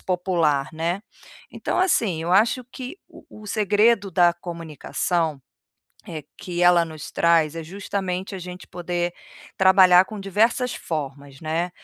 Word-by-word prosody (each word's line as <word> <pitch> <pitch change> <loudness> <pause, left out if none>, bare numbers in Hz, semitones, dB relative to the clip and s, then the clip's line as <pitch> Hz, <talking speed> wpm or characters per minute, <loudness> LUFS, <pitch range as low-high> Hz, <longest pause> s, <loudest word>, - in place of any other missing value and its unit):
popular, 170 -6 0
né". 170 +4 -2 0.5
Então - - -3
assim, 225 - +2
eu 175 - -1
acho 225 +6 +3
que 255 +7 -9
o - - -16 0.2
o - - -11
segredo 210 0 +2
da 175 0 +4
comunicação, 165 -2 -3 0.7
eh, 155 -4 -7
que 175 -1 -4
ela 175 -1 +6
nos 155 -2 -9
traz, 165 -2 +2
é 165 - -4
justamente 190 +1 -4
a - - -5
gente 180 0 -9
poder 175 0 -3 0.4
trabalhar 185 -1 +6
com 215 +1 -8
diversas 225 +6 +1
formas, 140 -3 -6
né. 165 +3 -2
180 Hz, 135 wpm, -23 LUFS, 165-195 Hz, 0.7 s, ela